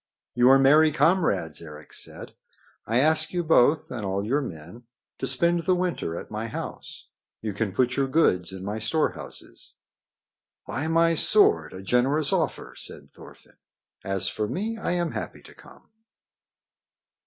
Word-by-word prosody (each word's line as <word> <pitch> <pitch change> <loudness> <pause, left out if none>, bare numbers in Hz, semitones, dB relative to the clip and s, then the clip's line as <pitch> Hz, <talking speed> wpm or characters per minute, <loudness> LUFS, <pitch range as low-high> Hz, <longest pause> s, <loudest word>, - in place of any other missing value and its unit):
"You 125 +1 +4
are 135 - +8
merry 150 +4 +5
comrades," 155 - +1
Eric 75 -2 -12
said. - - -6 0.5
"I 115 - +1
ask 155 +4 +3
you 175 -1 0
both 155 0 +3
and 120 -4 -5
all 100 +1 -2
your 140 +7 +1
men 90 - -9 0.3
to - - -2
spend 170 0 +2
the 185 +2 +2
winter 175 - -2
at - - -11
my 110 +2 -4
house. - - -8 0.3
You 110 -2 -4
can 100 0 -2
put 125 +4 0
your 135 -1 +1
goods 95 - +2
into 95 0 -8
my 105 +2 -3
storehouses." 115 +9 -3 0.9
"By 130 +9 -3
my 165 +1 +3
sword! 115 - +3
a 95 +1 -9
generous 135 +7 +1
offer," - - -2
said - - -9
Thorfinn. - - -16 0.5
"As 95 -1 -1
for 105 -1 -2
me, 215 - -3
I 220 -5 -2
am 175 -1 -1
happy - - -6
to - - -15
come." - - -18
130 Hz, 155 wpm, -25 LUFS, 100-160 Hz, 0.9 s, are